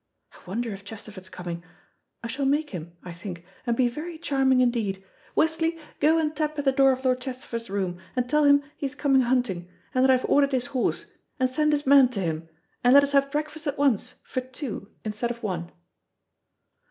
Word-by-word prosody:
I - - -17
wonder 230 +5 -2
if 200 0 -8
Chesterford's 200 -2 -9
coming. 170 -1 -6 0.6
I - - -3
shall 270 +4 -2
make 295 +2 +1
him, 170 -1 -7
I 180 - -7
think, 175 0 -8 0.2
and 235 -1 +1
be 255 - +4
very 315 +7 -5
charming 270 -5 +2
indeed. 225 -6 +1 0.3
Westley, 325 +1 +2 0.2
go 315 +3 +4
and 310 -1 0
tap 305 0 -1
at 290 - -2
the 270 - +5
door 270 0 +5
of 260 0 -3
Lord 255 -1 +2
Chesterford's 250 -3 -5
room, 190 -3 -2 0.2
and 250 -1 0
tell 300 +3 +3
him 285 0 +6
he 280 - -2
is 270 - -8
coming 275 -3 +3
hunting, 235 -8 0 0.2
and 255 - +3
that 265 - +5
I've 255 -1 +4
ordered 280 -1 +3
his 250 -2 +1
horse, 255 - 0 0.3
and 255 - +3
send 300 +4 +1
his 290 -1 0
man 270 -2 +7
to 205 - -2
him, 165 -2 -3 0.3
and 245 +2 +6
let 280 - +9
us 280 - 0
have 275 0 +3
breakfast 305 +2 -3
at 285 - -1
once 275 -7 +1
for 255 - -3
two 255 -5 -6 0.2
instead 215 +3 -2
of 235 0 -6
one." 175 -4 -3
255 Hz, 205 wpm, -26 LUFS, 205-285 Hz, 0.6 s, let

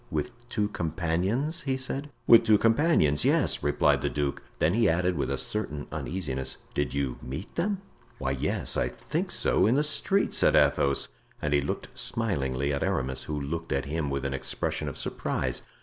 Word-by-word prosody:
"With 75 +9 -2 0.2
two 105 -3 0
companions?" 90 - -1
he 135 -2 -1
said. 135 +2 -3 0.2
"With 115 - +8
two 110 -2 +5
companions, 115 - +3
yes," - - +3
replied - - +2
the - - 0
duke. 70 -1 -2 0.2
Then 80 - +2
he 115 +1 +3
added 90 +2 +1
with 70 - -1
a - - -1
certain 75 -9 -2
uneasiness, 75 -8 -3 0.2
"Did 70 -2 -1
you 70 -3 -2
meet 70 +9 -7
them?" 195 +2 -1 0.3
"Why, 65 0 -2
yes, 65 - +2
I - - +1
think - - -3
so—in 115 +5 +2
the 145 - +3
street," 195 +6 0
said - - +3
Athos; 70 -1 +3 0.3
and 75 -1 -1
he 70 - +4
looked 70 - -4
smilingly 70 - -1
at 70 - -2
Aramis, 65 0 -1
who 75 -1 -3
looked 80 +4 -4
at 70 0 0
him 75 0 -2
with 70 0 -2
an 70 - -1
expression 65 - -2
of - - -8
surprise. 65 -1 -2
80 Hz, 180 wpm, -28 LUFS, 70-115 Hz, 0.3 s, With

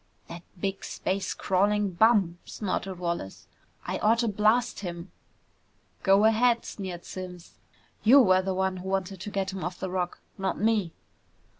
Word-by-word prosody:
"That 170 - -8 0.2
big 195 +1 -3
space 190 0 -2
crawling 200 +1 +1
bum!" 190 -3 +3
snorted 195 -2 -3
Wallace. 170 - -4 0.4
"I - - -3
oughta 230 +2 +3
blast 215 +4 +2
him!" 175 -2 -6 0.9
"Go 195 +2 +5
ahead!" 230 +2 +3
sneered 185 -4 -6
Simms. 180 -2 -9 0.4
"You 255 +6 +8
were 185 -7 +5
the 190 0 -2
one 190 0 0
who 185 +1 -6
wanted 190 -1 -2
to 205 - -5
get 195 -1 -2
him 190 - -5
off 175 0 -4
the 190 - -4
Rock, 180 -1 -2 0.2
not 190 0 -1
me!" 210 -6 +1
190 Hz, 150 wpm, -27 LUFS, 185-210 Hz, 0.9 s, You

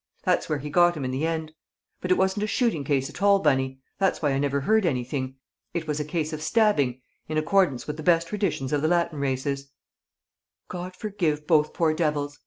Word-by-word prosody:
That's - - +1
where 155 - +1
he 145 +1 -6
got 175 0 +4
him 140 - -3
in 130 - -2
the 140 +5 -1
end. 160 -1 -3 0.5
But 180 - -4
it 185 - +4
wasn't 190 +2 +1
a 210 - 0
shooting 220 - 0
case 135 -1 0
at - - -10
all, 200 0 +6
Bunny; 135 -5 0 0.2
that's 195 -1 +2
why 145 -3 +1
I 135 - 0
never 140 0 0
heard 220 +9 +3
anything. 130 -3 -2 0.4
It 170 -1 -2
was 150 0 -1
a - - 0
case 155 +1 -2
of 155 - -5
stabbing 155 - +2 0.3
in 155 - -1
accordance 155 -4 +2
with 150 0 -5
the - - -6
best 170 +1 +3
traditions 195 -10 -2
of 145 - +1
the 155 - +2
Latin 170 -3 +1
races." 140 0 -2 1.0
"God 180 +1 -6
forgive 175 -8 -2
both 155 -2 +3
poor 160 -2 +2
devils!" 150 -3 -1
155 Hz, 210 wpm, -25 LUFS, 140-175 Hz, 1.0 s, all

